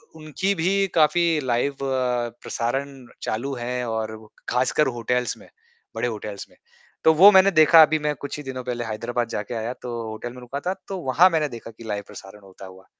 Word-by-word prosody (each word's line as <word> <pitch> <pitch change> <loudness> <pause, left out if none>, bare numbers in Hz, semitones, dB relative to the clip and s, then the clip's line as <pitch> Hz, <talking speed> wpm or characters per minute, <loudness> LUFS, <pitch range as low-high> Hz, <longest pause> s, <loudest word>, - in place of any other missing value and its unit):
उनकी 160 +6 -2
भी 195 +2 +2
काफ़ी 160 +2 +4 0.2
लाइव 130 +3 0
प्रसारण 125 +1 -2 0.3
चालू 135 +6 -3
है 125 +1 -3
और 110 -1 -3 0.3
खासकर 130 +4 +2
होटल्स 125 +1 -1
में - - -16 0.5
बड़े - - -1
होटल्स 105 -3 -6
में। - - -24 0.5
तो 160 - +6
वो 195 +6 +8
मैंने 190 0 +6
देखा 160 -1 +7
अभी 155 0 +2
मैं 150 0 -1
कुछ 140 +1 -5
ही 150 - -7
दिनों 130 -1 -6
पहले 120 -1 -3
हैदराबाद 115 +2 -3
जा 105 - -2
के 120 - -8
आया 115 +2 -3
तो 125 - -6 0.2
होटल 120 +3 -7
में 125 - -11
रुका 130 +3 -6
था, 180 +5 -2
तो 195 - -4
वहाँ 165 +5 +4
मैंने 155 -4 0
देखा 115 -1 -9
कि 115 +1 -14
लाइव 105 -1 -3
प्रसारण 95 +2 -12
होता 95 0 -13
हुआ 95 0 -14
125 Hz, 195 wpm, -23 LUFS, 115-155 Hz, 0.5 s, वो